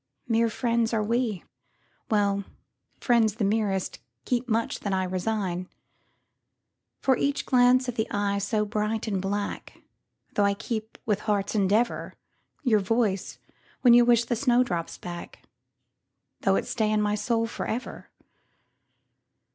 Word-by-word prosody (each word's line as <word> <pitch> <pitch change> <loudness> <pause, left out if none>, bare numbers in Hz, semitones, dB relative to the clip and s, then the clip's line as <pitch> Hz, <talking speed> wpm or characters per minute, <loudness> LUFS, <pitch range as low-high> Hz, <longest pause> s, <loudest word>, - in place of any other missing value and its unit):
Mere 230 0 +2
friends 230 0 0
are 215 - +1
we,—well, 210 -2 -2 0.6
friends 225 -4 +3
the 220 - 0
merestKeep 195 - -2
much 230 0 0
that 200 - -2
I 190 0 +1
resign:For 185 +6 -5
each 280 +3 -1
glance 255 0 +4
of 245 - -2
the 220 - -1
eye 200 0 0
so 210 +2 0
bright 210 +1 -1
and 195 -3 -1
black, 200 +1 -4 0.5
Though 205 - +2
I 200 0 +2
keep 220 +1 -5
with 210 -2 +1
heart's 205 -2 -1
endeavour,—Your 215 +3 -1
voice, 205 -1 0 0.4
when 245 -2 +7
you 240 0 +8
wish 235 -1 +4
the 240 - 0
snowdrops 240 -9 +1
back, 175 -1 -8 1.0
Though - - +2
it - - 0
stay 220 -4 0
in 215 - +2
my 210 0 +1
soul 230 +2 0
for 230 - -5
ever! 240 +3 -5
215 Hz, 125 wpm, -26 LUFS, 200-235 Hz, 1.0 s, you